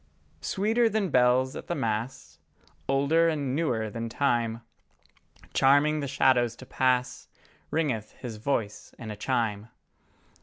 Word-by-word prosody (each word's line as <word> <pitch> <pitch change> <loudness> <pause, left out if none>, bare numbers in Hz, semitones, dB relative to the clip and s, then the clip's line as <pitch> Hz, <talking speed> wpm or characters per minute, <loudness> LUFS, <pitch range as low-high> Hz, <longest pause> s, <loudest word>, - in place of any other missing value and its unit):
Sweeter 225 +4 +1
than 215 -3 0
bells 125 +1 +3
at - - -8
the 175 - -2
Mass, 115 +3 -3 0.5
Older 140 +5 +3
and 140 -4 -2
newer 125 -9 0
than 115 +1 -4
time, 115 -3 0 0.9
Charming 145 +3 +4
the 140 - -3
shadows 125 -3 +2
to 130 - -12
pass 125 -1 0 0.4
Ringeth 135 -10 -1
His 115 -4 -8
voice 110 -3 -3
in 110 -2 -7
a - - -6
chime. 110 -2 -1
130 Hz, 125 wpm, -27 LUFS, 115-145 Hz, 0.9 s, Charming